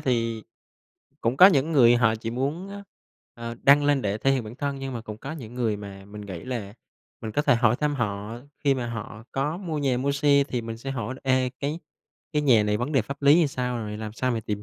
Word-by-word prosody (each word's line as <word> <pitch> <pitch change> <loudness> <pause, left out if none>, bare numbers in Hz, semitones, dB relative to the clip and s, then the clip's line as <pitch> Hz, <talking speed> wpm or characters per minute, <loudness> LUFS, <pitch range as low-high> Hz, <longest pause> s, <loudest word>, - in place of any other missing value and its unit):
thì 115 -3 0 0.8
cũng 115 +3 0
có 185 - +10
những 155 -3 +3
người 120 -5 +6
họ 115 -2 +3
chỉ 115 +1 -5
muốn, 145 +10 -2
ơ, 200 0 -8 0.5
ờ, 115 0 -6
đăng 145 +1 +6
lên 145 -2 +2
để 105 +1 -1
thể 135 - +2
hiện 130 -4 0
bản 110 +2 -8
thân, 140 0 -3
nhưng 135 0 -5
mà 120 - -4
cũng 110 -2 -8
có 140 +4 -6
những 120 -7 -9
người 115 -4 0
mà 100 -1 -9
mình 105 +1 -10
nghĩ 95 -5 -7
là 115 -6 -5 0.5
mình 110 -1 -5
có 145 - +1
thể 135 - +4
hỏi 120 0 +3
thăm 150 -1 0
họ 105 0 -3 0.2
khi 140 -1 +4
mà 125 -2 -3
họ 110 -1 -7
có 145 +4 -1
mua 165 -6 -4
nhà, 135 -3 +1
mua 140 +2 0
xe. 140 -1 +4
Thì 125 -2 -2
mình 115 0 -6
sẽ 135 +4 -6
hỏi 130 -1 -3
là 130 - -13
"Ê, 130 -1 +2
cái 145 +3 -2 0.5
cái 150 -1 +1
nhà 120 -7 +5
này 105 0 +1
vấn 125 +6 -3
đề 135 -5 +3
pháp 140 +5 -8
lý 140 +1 +7
thì 170 -1 +4
sao?" 125 -3 -2
rồi 105 -2 -5
"Làm 110 0 -6
sao 130 +3 -1
mày 115 -2 -1
tìm 105 -1 -4
125 Hz, 255 wpm, -25 LUFS, 110-140 Hz, 0.8 s, có